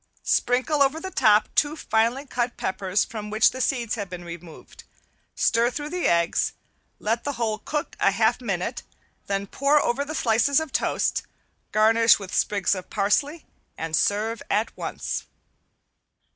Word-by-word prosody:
Sprinkle 260 +4 +1
over 280 +3 +3
the 375 +3 -6
top 210 - +4
two 295 0 +2
finely 235 0 0
cut 240 -2 -2
peppers 190 +1 -1
from 215 -2 -7
which 215 +1 +4
the 260 - -5
seeds 240 -4 0
have 205 -5 -4
been 175 -1 -7
removed, 170 -1 -11 0.5
stir 230 +1 +2
through 295 +3 -6
the 360 0 0
eggs, 170 0 +1 0.4
let 225 +2 -1
the 285 - -2
whole 225 -4 -2
cook 300 +7 -4
a - - +4
half 220 +5 +1
minute, 195 -1 -3 0.5
then 200 0 -1
pour 280 +8 +2
over 270 +1 0
the 305 +2 -6
slices 235 +3 +3
of 315 -3 -5
toast, - - 0 0.5
garnish 225 +2 +5
with 195 -2 -9
sprigs 205 -2 +1
of 185 -2 -6
parsley, 285 +11 0 0.3
and 160 -1 -2
serve 215 +5 0
at 215 +3 0
once. - - -4
225 Hz, 155 wpm, -24 LUFS, 200-275 Hz, 0.5 s, garnish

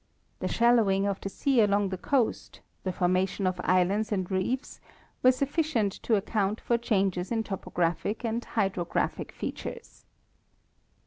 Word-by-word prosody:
The - - -2
shal 235 +1 +4
lowing 195 -3 +2
of 200 -1 -2
the 195 - -4
sea 265 +3 +2
along 205 -1 +2
the 190 - -2
coast, 255 -1 -1 0.2
the 185 - -1
formation 185 +2 0
of 180 -1 0
islands 190 +4 +2
and 190 -2 -1
reefs, 190 +8 -2 0.4
were 255 - +7
sufficient 275 - 0
to 225 - +2
account 205 +1 0
for 235 - +1
changes 195 -5 0
in 225 -1 +1
topographic 195 +2 -2
and 230 +1 -1
hydrographic 190 -5 -1
features. 470 -1 -7
205 Hz, 140 wpm, -28 LUFS, 190-235 Hz, 0.4 s, were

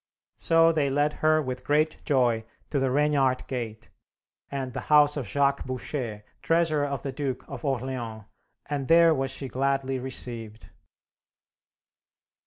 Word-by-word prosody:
So 165 0 +4
they 150 -4 +1
led 145 +2 +1
her 155 0 +4
with 130 -1 -5
great 155 +2 +1
joy 120 -5 +2 0.3
to 145 - +1
the 135 0 +1
Regnart 140 -2 +2
Gate, 115 -4 -6 0.6
and 135 -3 -4
the - - -3
house 150 -1 +6
of 135 -7 -4
Jacques 140 +3 +1
Boucher, 125 -4 -4 0.2
treasurer 165 -3 +2
of 140 -2 -4
the 140 - -3
Duke 135 -2 -4
of 135 -4 -8
Orleans, 125 -5 -3 0.4
and 140 -2 -3
there 165 0 +6
was 135 -2 -1
she 135 +1 -4
gladly 135 +1 -1
received. 120 -4 -5
135 Hz, 140 wpm, -26 LUFS, 125-150 Hz, 0.6 s, house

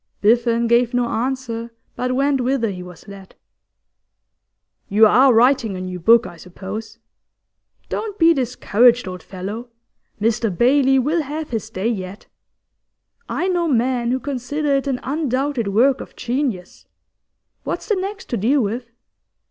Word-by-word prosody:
Biffen 235 +2 +2
gave 235 +1 +2
no 245 0 +2
answer, 235 -1 -3 0.3
but 250 0 -2
went 275 0 +1
whither 245 -3 0
he 180 -2 -7
was 180 +2 -12
led. 195 -1 -12 1.5
'You 215 +3 +6
are 260 +5 +6
writing 235 -3 +3
a - - -6
new 185 -1 -5
book, 230 +7 +5
I 175 - -9
suppose? 205 +6 -8 0.9
Don't 420 -2 -4
be 335 -2 +5
discouraged, 245 -3 +2
old 185 -1 -6
fellow. 205 +6 -7 0.5
"Mr 225 +1 +1
Bailey" 265 +7 +3
will 300 +6 +1
have 300 +1 -6
his 220 -2 -3
day 195 0 -3
yet; 195 -3 -4 1.0
I 365 - -1
know 350 -2 0
men 245 -3 +1
who 255 +1 0
consider 285 +2 -2
it 275 0 0
an 260 -2 -1
undoubted 275 -4 -1
work 245 +7 +3
of - - -11
genius. 245 -7 -3 0.8
What's - - -4
the 435 - +2
next 390 +1 -5
to 240 - -1
deal 260 +8 +2
with? 230 +3 -3
240 Hz, 145 wpm, -20 LUFS, 215-270 Hz, 1.5 s, You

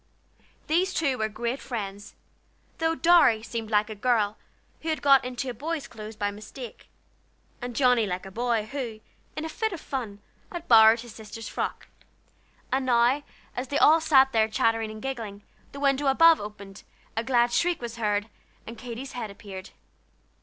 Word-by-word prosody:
These 360 +5 +1
two 275 -5 0
were 220 0 0
great 235 +5 -3
friends, 205 -4 -6 0.6
though 325 0 +1
Dorry 310 -11 +5
seemed 225 -1 -5
like 210 -1 +2
a 220 - -6
girl 215 -1 +1 0.5
who 325 - -4
had 315 - 0
got 275 -2 +6
into 250 0 -4
boy's 305 +5 -4
clothes 215 0 -9
by 205 -1 -1
mistake, 215 +4 -10 0.7
and 245 -1 -5
Johnnie 250 -4 +3
like 185 0 -4
a 195 - -9
boy 230 0 0
who, 235 -3 -5 0.4
in 310 - -4
a - - -2
fit 440 +6 -2
of 345 - -5
fun, 240 -9 -5 0.3
had 345 -2 -7
borrowed 225 0 +7
his 240 -2 -11
sister's 220 0 -9
frock. - - -4 0.8
And 265 +1 +1
now, 245 +3 +3 0.3
as 250 +2 -3
they 285 - -1
all 320 +2 +6
sat 270 -4 +5
there 220 -3 +3
chattering 225 0 +1
and 215 +1 -9
giggling, 225 -7 -5 0.3
the 280 - -9
window 280 0 +2
above 325 +4 +6
opened, 200 -2 -9 0.3
a 225 - -1
glad 240 -1 +2
shriek 350 -1 +2
was 235 -1 -6
heard, 210 -2 0 0.4
and 230 +1 -9
Katy's 250 +2 -7
head 235 -4 -5
appeared. 195 -1 -9
240 Hz, 170 wpm, -26 LUFS, 215-275 Hz, 0.8 s, borrowed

